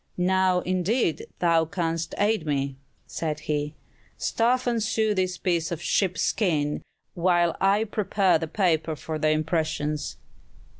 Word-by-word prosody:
"Now 185 0 +2
indeed 185 +1 0
thou 165 -2 +3
canst 165 -1 -2
aid 210 -3 +2
me," 140 -2 -1 0.3
said 155 -2 -3
he; 150 0 -2 0.4
"stuff 245 +2 +1
and 235 -2 +1
sew 220 0 +1
this 185 -2 -1
piece 170 -3 0
of 170 - -3
sheep 185 +1 +1
skin, 150 -8 0 0.3
while 175 -1 +2
I 200 +3 +4
prepare 200 -4 +1
the 160 - -3
paper 160 -3 +1
for 155 +1 -5
the 155 - +2
impressions." 155 -1 -1
175 Hz, 135 wpm, -26 LUFS, 155-195 Hz, 0.4 s, I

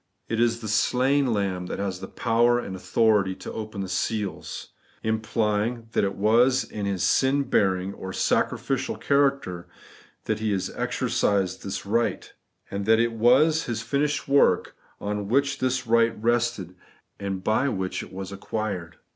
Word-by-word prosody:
It 115 - -2
is 115 0 +2
the 110 - -5
slain 130 +6 +2
Lamb 95 -4 -1
that - - -4
has 95 -2 -3
the 95 - -7
power 120 +1 +2
and 100 -6 -4
authority 100 -1 +2
to - - -8
open 110 -2 -5
the 95 - -3
seals; 100 +2 -3 0.3
implying 110 +1 -1
that - - +1
it 100 0 -1
was 120 +6 +3
in 105 -2 -5
His 95 -2 -1
sin 140 +1 +3
bearing 95 -5 +1
or 95 - -7
sacrificial 135 +6 0
character 140 -11 +1 0.6
that 110 -1 -1
He 105 -2 0 0.2
exercised 95 -2 0
this 95 +1 -5
right, 115 +3 -1 0.4
and 100 +1 -3
that 110 0 +6
it 115 0 +2
was 130 +8 +4
His 115 -1 -3
finished 145 +2 -1
work 140 0 +3 0.2
on 105 0 -3
which 140 +4 +1
this 130 0 0
right 115 0 +3
rested, 120 -5 0 0.5
and 95 -2 -4
by 110 +7 +2
which 95 -5 -3
it - - -10
was 95 +1 -6
acquired. 100 -4 -4
110 Hz, 155 wpm, -25 LUFS, 100-120 Hz, 0.6 s, that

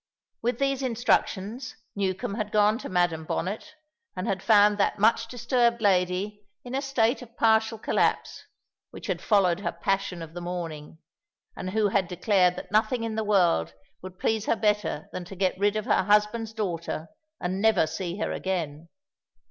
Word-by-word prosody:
With 240 +2 0
these 275 -1 0
instructions, 235 -2 0 0.2
Newcombe 190 -1 -2
had 210 -1 -3
gone 210 +1 +3
to - - -7
Madam 175 -3 +1
Bonnet 210 - -4 0.4
and 185 +1 -3
had 190 -3 -1
found 210 -1 +5
that 200 - +2
much 225 +2 +3
disturbed 240 -1 +1
lady 195 0 +1 0.2
in 245 - -8
a 270 - 0
state 265 -3 +1
of 235 -1 -13
partial 220 0 +3
collapse, - - 0 0.4
which - - -10
had - - -2
followed 190 -5 +3
her 200 - -2
passion 180 0 -2
of 160 0 -11
the 175 - -6
morning, 165 -4 -6 0.6
and 185 - -5
who 210 +1 +1
had 195 -2 +1
declared 180 0 +2
that - - -9
nothing 220 +3 +2
in 225 -1 -2
the 220 0 -1
world 175 - +2 0.3
would 185 0 -10
please 220 +1 -1
her - - +3
better 210 -7 0
than 180 - -5
to 195 - -10
get 185 0 +1
rid 205 +1 +2
of 215 -1 -2
her - - +3
husband's 210 +2 +2
daughter 170 -6 -3 0.3
and 185 +2 -2
never 220 -6 +4
see 170 +3 -4
her 210 - -2
again. 170 -4 -3
205 Hz, 170 wpm, -26 LUFS, 180-220 Hz, 0.6 s, found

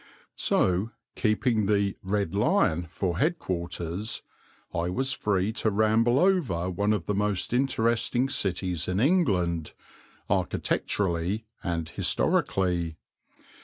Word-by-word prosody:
So, 95 +4 +2 0.3
keeping 110 -1 +1
the 100 -1 +1
"Red 100 -2 -1
Lion" 100 - +2
for 90 -2 -2
head 165 +3 +2
quarters, 90 - -3 0.5
I 85 +1 -1
was 130 +8 0
free 100 0 0
to 110 - 0
ramble 110 +4 +3
over 140 - +2
one 100 +4 0
of 105 -6 -1
the 105 - -1
most 105 +1 -1
interesting 120 0 +1
cities 90 - -1
in 90 +1 0
England, 95 - +1 0.5
architecturally 95 +3 -1 0.2
and 85 -3 -2
historically. 85 -2 +1
100 Hz, 110 wpm, -27 LUFS, 90-115 Hz, 0.5 s, ramble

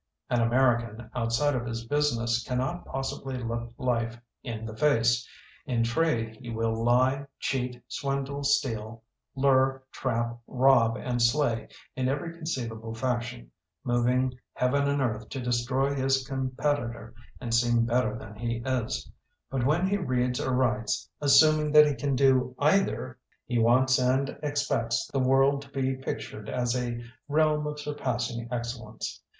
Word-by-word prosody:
"An 120 - +3
American, 120 -1 +1
outside 120 +5 +1
of 120 -2 -2
his 115 0 -4
business, 120 -4 +1
cannot 130 +7 -2
possibly 135 0 -4
look 120 -1 -4
life 120 -2 -1 0.2
in 115 -2 -5
the 110 -1 -7
face. 120 -2 +2 0.4
In 120 -4 +1
trade 115 -4 0
he 120 - -8
will 115 0 -1
lie, 130 +4 +2
cheat, 125 -2 -2
swindle, 140 0 -3
steal, 115 -5 0 0.3
lure, 135 -1 +3
trap, 120 -2 -2
rob, 125 -3 +4
and 120 -1 -2
slay 120 -3 +2 0.3
in 130 -1 0
every 145 +5 -2
conceivable 115 -9 -4
fashion, 120 - -3 0.3
moving 125 +1 +1 0.2
heaven 140 +3 +1
and 140 -1 +1
earth 110 -3 -2
to 135 - -5
destroy 125 +3 0
his 135 -1 +1
com 130 -1 -2
petitor 125 -4 -2 0.3
and 115 - -4
seem 120 0 +3
better 115 -2 +1
than 105 - -10
he 115 +1 -3
is, 130 -4 -1 0.4
but 130 -2 -1
when 165 +5 +2
he 200 +1 +1
reads 125 -7 0
or 130 - -1
writes, 110 -4 0
assuming 155 +1 +5
that 150 0 +9
he 145 - +1
can 140 -1 -1
do 130 -1 +3
either, 150 - +1 0.3
he 120 -1 0
wants 130 +3 +4
and 130 +2 +1
expects 140 -6 0
the 135 - +1
world 135 +2 +3
to 140 - -13
be 135 -1 -1
pictured 110 -5 -6
as 125 -1 0
a 120 -1 -3 0.2
realm 150 0 +2
of 150 0 -5
surpassing 125 -5 -3
excellence. 120 -2 -5
125 Hz, 145 wpm, -28 LUFS, 115-135 Hz, 0.4 s, that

